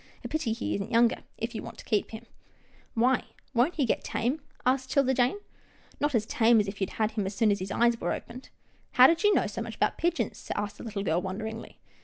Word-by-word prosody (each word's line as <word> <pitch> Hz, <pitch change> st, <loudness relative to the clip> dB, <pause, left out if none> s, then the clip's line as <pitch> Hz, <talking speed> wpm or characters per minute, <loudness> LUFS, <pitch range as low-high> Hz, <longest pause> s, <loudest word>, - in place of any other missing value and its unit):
A -, -, -4 dB
pity 310 Hz, -7 st, -1 dB
he 230 Hz, +2 st, -2 dB
isn't 200 Hz, +2 st, -3 dB
younger, 235 Hz, 0 st, +4 dB, 0.2 s
if 230 Hz, +1 st, -3 dB
you 220 Hz, -, -4 dB
want 230 Hz, -1 st, -9 dB
to -, -, -11 dB
keep 215 Hz, -3 st, 0 dB
him/' 225 Hz, +1 st, -9 dB, 0.7 s
"Why, 250 Hz, +3 st, +3 dB, 0.3 s
won't 250 Hz, +8 st, +2 dB
he 285 Hz, -, +2 dB
get -, -, 0 dB
tame?" 255 Hz, +7 st, -1 dB, 0.2 s
asked 260 Hz, +1 st, +1 dB
'Tilda 265 Hz, -1 st, +3 dB
Jane. 250 Hz, +7 st, +2 dB, 0.3 s
" -, -, -29 dB
Not 290 Hz, -2 st, +1 dB
as 215 Hz, -2 st, +2 dB
tame 230 Hz, 0 st, +4 dB
as 205 Hz, -, +1 dB
if 200 Hz, +1 st, -6 dB
you 195 Hz, -, +2 dB
had 215 Hz, 0 st, 0 dB
him 210 Hz, -3 st, -2 dB
as 195 Hz, -, -5 dB
soon 220 Hz, -1 st, +3 dB
as 200 Hz, -, 0 dB
his 185 Hz, +1 st, -4 dB
eyes 235 Hz, +1 st, +2 dB
were -, -, 0 dB
opened." 250 Hz, +2 st, -7 dB, 0.2 s
" -, -, -37 dB
How 250 Hz, -, +8 dB
did 330 Hz, +6 st, +4 dB
you 415 Hz, -, +6 dB
know -, -, +3 dB
so -, -, -4 dB
much -, -, -6 dB
about -, -, 0 dB
pigeons? 345 Hz, +1 st, -1 dB
" -, -, -15 dB
asked 205 Hz, 0 st, -3 dB
the -, -, -8 dB
little 210 Hz, -4 st, -4 dB
girl, 175 Hz, -2 st, +1 dB
wonderingly. 220 Hz, +4 st, -6 dB
230 Hz, 250 wpm, -28 LUFS, 210-255 Hz, 0.7 s, How